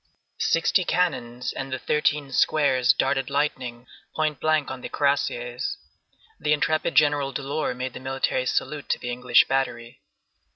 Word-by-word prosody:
Sixty 165 +3 +2
cannons 125 -9 -1
and 135 0 -5
the 130 - -1
thirteen 145 +1 0
squares 130 -3 +3
darted 135 -1 0
lightning 130 -4 -2 0.3
point 155 -2 0
blank 155 -3 +1
on 130 -1 -7
the - - -6
cuirassiers. 405 - -1 0.6
The 150 - +2
intrepid 155 +2 0
General 145 -2 +3
Delort 140 +1 -2
made 130 0 -4
the - - -7
military 130 -1 -1
salute 150 +2 -2
to - - +2
the 125 - -5
English 125 +1 +4
battery. 120 -3 -2
140 Hz, 140 wpm, -25 LUFS, 130-150 Hz, 0.6 s, English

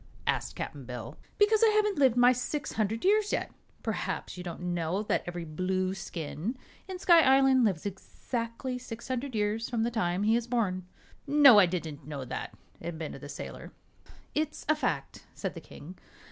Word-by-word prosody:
asked - - -1
Cap'n 140 - -5
Bill. 120 -2 -7 0.2
"Because 420 +1 +4
I 450 - +7
haven't 420 -5 +2
lived 260 -4 +4
my 245 +1 +7
six 255 +4 -2
hundred 220 - -1
years 420 +1 +3
yet. - - -1 0.3
Perhaps - - -3
you 180 - -7
don't 175 -1 -6
know 175 +4 -1
that - - 0
every 175 -1 -4
Blueskin 185 - -3 0.3
in 375 -1 -5
Sky 345 -2 +6
Island 265 -2 +5
lives 190 -7 +1
exactly 230 +5 -4
six 235 -2 -8
hundred 255 0 -3
years 215 +2 0
from 230 -3 0
the 235 - 0
time 180 -4 0
he 220 +2 +4
is 235 0 -1
born." 190 -7 -1 0.4
"No; 280 -6 +8
I 190 - +6
didn't 160 -5 -5
know 140 -3 -5
that," - - -5 0.3
admitted 160 -5 -6
the 145 - -8
sailor. 145 - -8 0.6
"It's 305 0 -2
a 310 - +4
fact," 305 - -3
said - - -3
the - - -8
King. 175 +6 -12
220 Hz, 175 wpm, -29 LUFS, 175-265 Hz, 0.6 s, No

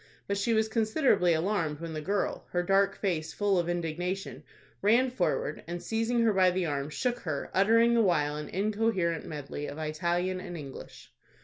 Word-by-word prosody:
But 200 - 0
she 225 +3 +1
was 220 0 +2
considerably 220 - +2
alarmed 160 -3 0
when 165 -1 -6
the 155 - -4
girl, 200 +6 -2
her 175 0 +1
dark 195 +1 +3
face 160 -5 -2
full 200 -3 +2
of 170 0 -1
indignation, 175 +3 -3 0.4
ran 240 +5 +4
forward, 175 -8 -1
and, 175 +1 -4
seizing 225 +2 0
her 225 -2 +3
by 185 -1 +5
the 180 0 -1
arm, 140 -2 -2
shook 245 - -1
her, 155 -8 -4
uttering 230 +5 +4
the 235 - +4
while 150 -7 +2
an 150 -1 -6
incoherent 200 -4 0
medley 145 -1 -5
of 145 - -7
Italian 175 +4 -1
and 180 -2 -7
English. 140 -4 -10
185 Hz, 180 wpm, -29 LUFS, 160-215 Hz, 0.4 s, by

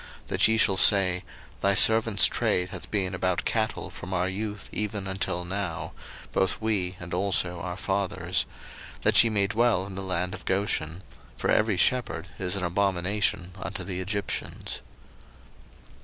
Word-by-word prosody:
01:046:034 - - -25
That - - +4
ye 110 0 +2
shall 100 -3 +3
say, 95 -2 +5 0.4
Thy 100 0 +2
servants' 110 -1 +6
trade 90 0 +1
hath 90 -1 -9
been 95 -3 0
about 95 -1 -1
cattle 110 -1 -1
from 95 +1 -6
our 90 +1 +1
youth 105 +1 -5
even 105 -1 -3
until 95 -2 -2
now, 95 -3 -4 0.4
both 95 -1 +1
we, 95 -5 -1
and 90 0 -8
also 90 -2 0
our 90 0 -5
fathers: 95 -2 -1 0.6
that - - +7
ye 115 - +1
may 105 -2 +2
dwell 110 -2 +1
in 95 - -8
the 95 - -5
land 90 -1 -2
of - - -9
Goshen; 95 -3 -1 0.3
for - - 0
every 105 -3 +2
shepherd 105 -8 +1
is 90 0 -1
an 95 - -2
abomination 95 +1 0
unto - - -5
the 95 -2 -5
Egyptians. 100 +1 -4
95 Hz, 155 wpm, -26 LUFS, 90-105 Hz, 0.6 s, that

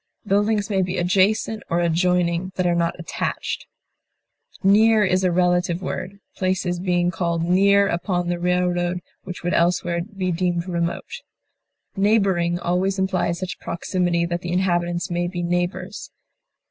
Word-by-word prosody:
Buildings 205 +1 +1
may 190 -1 +2
be 185 0 -2
adjacent 195 +4 +2
or 170 - +1
adjoining 175 +1 +1
that 185 - 0
are 175 - +3
not 170 0 0
attached. 165 - -4 1.0
Near 215 +2 +5
is 185 0 +1
a 180 - +3
relative 180 0 +1
word, 185 +2 -5 0.2
places 185 -1 -1
being 175 -1 +1
called 170 -1 -1
near 200 +3 +4
upon 175 0 -1
the 175 0 -1
railroad 180 0 0 0.2
which 180 - -7
would 175 - 0
elsewhere 170 0 +1
be 185 -1 -3
deemed 175 0 -1
remote. 170 -1 -3 0.7
Neighboring 195 -4 +2
always 180 +3 0
implies 190 -2 0
such 185 0 -5
proximity 175 0 -1
that 175 0 -3
the 175 - -4
inhabitants 175 -1 0
may 175 0 0
be 175 -1 -4
neighbors. 175 +1 -2
180 Hz, 140 wpm, -22 LUFS, 175-190 Hz, 1.0 s, Near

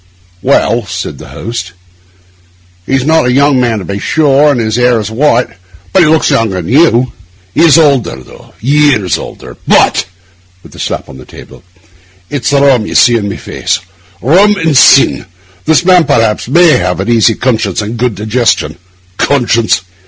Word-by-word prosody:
'Well,' 120 -3 0
said 90 +1 -6
the - - -11
host, 90 -7 -7 1.1
'he's 135 -1 -1
not 160 -4 +2
a - - +1
young 140 +1 +2
man, 120 -3 0
to 95 - -6
be 100 0 -5
sure, 145 +2 +2
and 135 - -1
his 110 -1 -2
hair 125 -1 +2
is 105 0 -5
white; 125 0 +1 0.5
but 190 - +4
he 160 - +3
looks 160 0 +2
younger 110 -5 0
than 90 +7 -4
you.' 130 -5 +2 0.4
'He - - 0
is 165 -2 +5
older, 140 - +1
though; 65 - -16
years 135 - +1
older. - - -10
But,' - - +2 0.6
with - - -16
a - - -13
slap - - -3
upon 65 - -14
the 65 - -13
table, - - -15 0.7
'it's 145 -4 -2
the 140 0 +1
rum 125 -6 +2
you - - -6
see 120 -1 +4
in 100 -2 -3
my - - -5
face—rum 95 - -1
and 165 -6 -1
sin. 135 -4 +4 0.4
This 160 +2 +2
man, 180 -3 +4
perhaps, 110 -1 0
may 170 +6 +4
have 90 +1 -2
an 95 - -3
easy 115 -1 +2
conscience 110 -7 -2
and 105 - -6
a - - -6
good 120 -2 -1
digestion. 110 -7 -1 0.4
Conscience! 120 -7 0
120 Hz, 175 wpm, -10 LUFS, 105-145 Hz, 1.1 s, is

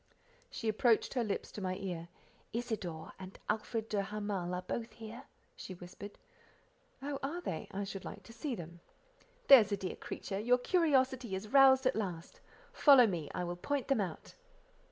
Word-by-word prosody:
She 230 - -5
approached 220 +1 +3
her 250 -3 +1
lips 210 -3 -3
to 210 - -7
my 185 -1 -1
ear—"Isidore 180 0 -6
and 190 0 -9
Alfred 220 0 -1
de 210 -2 0
Hamal 200 -3 -3
are 180 - -4
both 225 +4 -4
here," 225 +1 -9 0.3
she 190 - -8
whispered. 180 +3 -10 0.9
"Oh! 280 -1 -3 0.3
they 160 -4 -3
are? 200 - -3
I - - -1
should 195 -1 -6
like - - -8
to 230 - -13
see 250 +2 -3
them." 170 -2 -9 0.7
"There's 235 -7 +9
a 200 - +1
dear 185 - -4
creature! 195 -1 -5
your 245 +4 +4
curiosity 260 - +2
is 200 +3 -6
roused 265 -1 +7
at 255 - +3
last. 180 -6 -4 0.3
Follow 275 -5 +8
me, 170 -8 -2
I - - -1
will 175 0 -3
point 280 +9 -2
them 270 -6 +3
out." 180 -5 -5
210 Hz, 170 wpm, -34 LUFS, 185-245 Hz, 0.9 s, There's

